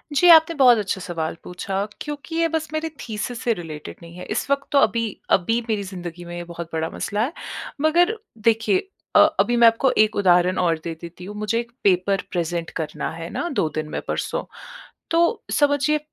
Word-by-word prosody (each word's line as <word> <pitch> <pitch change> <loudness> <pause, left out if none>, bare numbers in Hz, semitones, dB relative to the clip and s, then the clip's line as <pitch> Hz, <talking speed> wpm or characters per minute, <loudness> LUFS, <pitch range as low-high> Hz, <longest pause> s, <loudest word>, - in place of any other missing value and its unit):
जी, 355 +5 +5
आपने 320 +1 +6
बहुत 250 -4 +7
अच्छा 200 -2 -2
सवाल 165 -3 -3
पूछा, 195 +2 -3 0.2
क्योंकि 295 +2 -6
ये 335 0 +3
बस 320 -1 -2
मेरे 315 +1 -2
थीसिस 230 +2 -5
से 235 - +2
रिलेटेड 160 -5 -8
नहीं 170 +1 -12
है। 180 - -7
इस 255 - -2
वक्त 280 0 +1
तो 280 - +5
अभी 230 -3 +2 0.3
अभी 225 +6 0
मेरी 210 -2 0
ज़िंदगी 175 -2 -7
में 175 0 -6
बहुत 170 -1 -7
बड़ा 160 0 -1
मसला 210 +2 -2
है। 290 +7 -2 0.5
मगर 350 +7 +3 0.3
देखिए 230 - +2 0.3
अ - - +9
अभी 240 - +3
मैं 235 -1 +7
आपको 230 +3 +3
एक 215 0 +4
उदाहरण 180 -2 +3
और 170 -3 +2
दे 165 - -4
देती 175 +1 -9
हूँ। 205 +2 -8
मुझे 215 +2 -1
एक 235 0 -6
पेपर 195 0 +2
प्रेज़ेंट 170 -1 -2
करना 155 -1 -3
है 165 +1 -7
ना 345 - -3
2 180 - 0
दिन 155 -1 -2
में - - -4
परसों - - -2 0.7
तो 340 +8 +2
समझिए 290 +1 +2
210 Hz, 195 wpm, -22 LUFS, 175-280 Hz, 0.7 s, अ